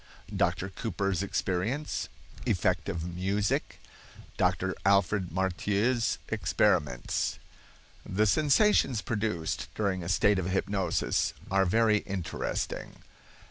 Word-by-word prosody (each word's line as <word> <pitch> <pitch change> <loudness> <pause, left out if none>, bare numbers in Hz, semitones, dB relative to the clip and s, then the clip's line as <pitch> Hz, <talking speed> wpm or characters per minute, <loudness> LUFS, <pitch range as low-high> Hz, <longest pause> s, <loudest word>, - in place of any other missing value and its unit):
—Dr. 95 - 0
Cooper's 100 -3 -2
Experience.—Effect 100 +9 -2
of 85 -1 -3
Music.—Dr. 100 +3 -2
Alfred 100 -1 +3
Marthieu's 100 +6 +1
Experiments. 65 -5 +1 0.7
The 105 +3 +1
sensations 145 - +3
produced 105 -7 -2
during 100 -3 0
a 85 - -5
state 95 +2 +3
of 90 0 -2
hypnosis 95 -2 0 0.2
are 95 0 +4
very 110 +2 +4
interesting. 95 -5 -4
100 Hz, 85 wpm, -29 LUFS, 95-110 Hz, 0.7 s, are